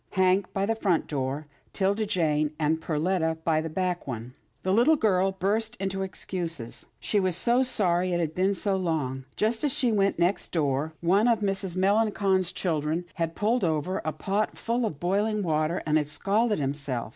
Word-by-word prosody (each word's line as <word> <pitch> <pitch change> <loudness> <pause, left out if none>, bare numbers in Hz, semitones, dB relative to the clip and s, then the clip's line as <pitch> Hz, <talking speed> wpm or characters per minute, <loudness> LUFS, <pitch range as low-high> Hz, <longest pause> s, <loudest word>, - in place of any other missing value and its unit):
Hank 190 0 +2
by 195 0 0
the 225 - +1
front 195 -7 +1
door, 140 +1 -3 0.3
'Tilda 200 +2 +1
Jane 155 -4 +1
and 160 +1 +1
Perletta 160 +1 0
by 160 -1 +2
the 160 - -4
back 180 +1 -2
one. 120 -1 -5 0.3
The 185 - +1
little 245 +9 +5
girl 195 -7 +2
burst 215 +5 0
into 195 -2 -3
excuses. 170 -9 -5
She 210 - +1
was 185 -3 +1
so 240 +6 +3
sorry 185 -8 +1
to 175 - +1
have 165 -2 -1
been 190 +3 +1
so 195 0 0
long. 145 -8 -2
Just 225 +4 0
as 295 - +2
she 250 -2 +1
went 200 -2 +2
next 175 +4 0
door, 150 -1 0
one 195 +6 +3
of 230 -3 +3
Mrs. 195 -3 -2
Melangon's 195 -2 +2
children 160 0 -1 0.2
had 165 0 -1
pulled 225 +3 +1
over 165 +3 0
a 155 - -1
pot 195 +7 -2
full 235 0 0
of 150 -8 -7
boiling 205 +4 0
water, 155 0 0
and 155 0 +3
had 150 -1 -3
scalded 210 +7 +1
himself. 135 -5 -3
185 Hz, 180 wpm, -27 LUFS, 155-205 Hz, 0.3 s, little